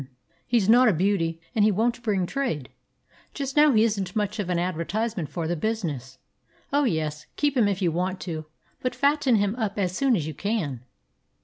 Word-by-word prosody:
He's 230 -5 +2
not 245 +3 +6
a 215 - +5
beauty, 165 -2 0
and 220 -4 +3
he 215 - +5
won't 235 +4 0
bring 200 -6 0
trade. 175 - -2 0.7
Just 275 -2 -4
now 300 0 +6
he 220 -3 +4
isn't 200 -5 -1
much 210 0 -1
of 195 -3 -2
an 180 - +1
advertisement 180 +2 -2
for 165 -2 -3
the 175 - 0
business. 150 - -3 0.6
Oh, 285 0 +3
yes, 155 - -2
keep 290 -1 +1
him 235 -5 +4
if 195 -1 -1
you 170 - +2
want 185 +3 -2
to, 160 -3 -5 0.4
but 255 - -2
fatten 280 -3 +3
him 205 0 +1
up 215 -4 -2
as 185 -2 0
soon 265 +2 +3
as 165 -7 -1
you 155 - -4
can." 155 - -2
200 Hz, 195 wpm, -25 LUFS, 170-230 Hz, 0.7 s, not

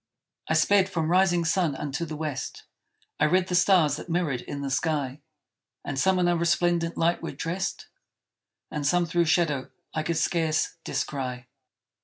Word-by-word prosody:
I - - +1
sped 200 -1 +4
from 165 -3 -1
rising 175 -2 +3
sun 165 -3 +1
unto 145 +4 -3
the 155 -1 -6
west; 150 -3 -5 0.6
I - - +4
read 185 +3 +2
the - - -2
stars 175 -5 +4
that 175 - -9
mirrored 165 -7 0
in 140 - -6
the 140 -1 -3
sky; 145 -2 -1 0.6
And 135 - -3
some 190 +4 +3
in 180 -1 +2
a 175 - +3
resplendent 170 0 +1
light 170 +1 +1
were - - -5
dressed, 170 +7 -3 0.9
And 150 - -3
some 175 +3 +3
through 170 +1 +1
shadow 160 -5 +1 0.2
I 155 - -1
could 165 +1 -1
scarce 160 -2 0
descry. 125 -3 -3
165 Hz, 165 wpm, -26 LUFS, 150-175 Hz, 0.9 s, sped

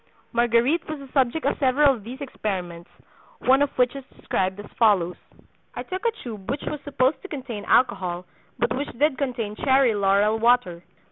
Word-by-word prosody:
Marguerite 240 +8 +2
was 310 - -3
the 275 -2 -12
subject 270 +3 +1
of - - 0
several 275 +1 +4
of 225 -5 -9
these 250 +6 -9
experiments, 180 -10 -5 0.5
one 265 +2 +3
of 285 - +3
which 250 +1 +2
is 275 - -7
described 190 +1 -2
as 205 - -7
follows: 195 -6 +3 0.6
"I - - -4
took 375 +1 -5
a - - +2
tube 215 -5 -8
which 280 +3 -2
was 300 - -4
supposed 280 0 0
to - - -8
contain 250 - -6
alcohol, 180 -7 +1 0.3
but 235 -1 0
which 280 +3 -3
did 290 0 +2
contain 240 -6 -2
cherry 265 -3 +3
laurel 205 +2 +2
water. 230 -7 +2
245 Hz, 180 wpm, -24 LUFS, 205-275 Hz, 0.6 s, several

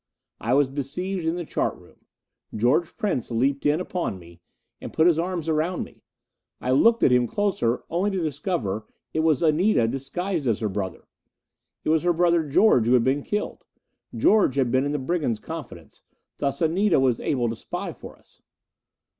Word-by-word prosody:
I 120 +4 +1
was 140 -2 +3
besieged 160 +6 -3
in 165 - +1
the 175 -1 -4
chart - - -1
room. - - -21 0.5
George 130 +10 +1
Prince 195 - -1
leaped 135 +5 0
in 150 +2 +2
upon 180 - -3
me 85 -1 -16 0.4
and - - -7
put 160 - +2
his 170 -2 +4
arms 175 -2 -2
around 160 +3 0
me. - - -14 0.6
I 125 - -2
looked 230 - +4
at - - +5
him 125 -1 +3
closer 160 - 0
only 180 +5 0
to 195 - -2
discover 140 - -2 0.3
it - - 0
was 160 -1 +2
Anita, 160 - +3
disguised 150 +5 -3
as 115 -3 +2
her 110 - -1
brother! 95 -2 -5 0.8
It - - -2
was 160 0 +3
her 175 0 +2
brother, 170 0 +3
George, 145 - +4
who 120 - +4
had 125 -2 +5
been 135 +3 +1
killed! 210 +8 -4 0.5
George 165 - +3
had 130 -4 +1
been 130 +2 +2
in 145 - -1
the 150 - -1
brigands' 140 -5 -1
confidence 160 -5 -9 0.4
thus 140 +4 -1
Anita 175 +3 +3
was 130 -3 +2
able 125 -5 0
to 115 - -3
spy - - -5
for - - -12
us. - - -25
150 Hz, 180 wpm, -24 LUFS, 125-175 Hz, 0.8 s, at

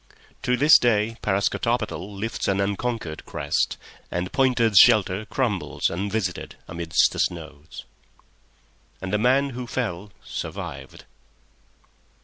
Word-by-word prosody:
To 125 0 +1
this 150 +4 +7
day 115 -1 +1
Parascotopetl 110 +3 0 0.2
lifts 115 +3 -3
an 95 0 +1
unconquered 100 -4 -2
crest, - - -1 0.3
and 90 +1 -3
Pointer's 125 -7 +4
shelter 105 -3 +5
crumbles 115 -7 -1
unvisited 95 +1 -3
amidst 85 -1 +1
the - - -6
snows. 80 -3 -4 1.1
And 95 +1 -5
the 105 - +2
man 135 +4 +3
who 125 0 -6
fell 105 -6 -3
survived. - - -7
105 Hz, 110 wpm, -24 LUFS, 95-120 Hz, 1.1 s, this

